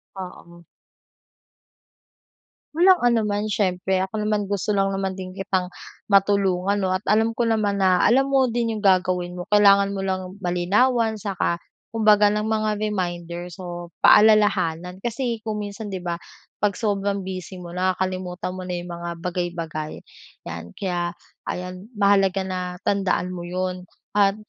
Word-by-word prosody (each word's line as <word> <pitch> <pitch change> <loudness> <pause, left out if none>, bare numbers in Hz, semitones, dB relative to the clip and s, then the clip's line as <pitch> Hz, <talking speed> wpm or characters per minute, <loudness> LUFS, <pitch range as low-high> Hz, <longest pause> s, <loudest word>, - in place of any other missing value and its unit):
Oo. 170 -2 -10 2.1
Walang 360 +2 +6
anuman 215 -3 +1
siyempre. 190 -2 0
Ako 190 +3 -4
naman 205 -2 0
gusto 205 +1 0
lang 195 0 +2
naman 195 -1 -2
din 185 -1 -7
kitang 185 -1 -2 0.4
matulungan 195 -1 +3
'no, 185 - +1
at 185 +2 -2
alam 220 +2 +3
ko 230 +1 -1
naman 215 -3 +1
na 185 -2 +3
alam 270 +3 +4
mo 270 -2 +3
din 230 -1 -1
yung 210 - -5
gagawin 180 -2 +2
mo. 180 - -5
Kailangan 200 -1 +5
mo 195 - -3
lang 185 -1 -3
malinawan 210 +7 +2
'saka 190 -4 -2 0.3
kumbaga 210 -2 +5
ng 210 - 0
mga 215 0 0
reminders 175 -3 -3
o 175 -1 -7
paalalahanan. 185 -5 +4
Kasi 235 +2 -2
kung 210 -1 -2
minsan 205 +1 -6
'di 190 -3 -5
ba, 170 -1 -3 0.4
pag 205 -1 +1
sobrang 200 -2 -1
busy 185 -1 -7
mo 170 - -8
nakakalimutan 185 0 -2
mo 185 0 -7
na 180 - -3
yung 175 0 -5
mga 170 0 -5
bagay, 180 0 -1
bagay 160 -2 -4 0.5
'yan. 85 0 -8
Kaya 175 -3 -2 0.3
ayan, 180 +2 -5
mahalaga 200 -2 +3
na 185 -1 -4
tandaan 195 -2 0
mo 175 -1 -6
'yon 180 0 -3 0.3
at 195 -1 +5
190 Hz, 145 wpm, -23 LUFS, 180-210 Hz, 2.1 s, Walang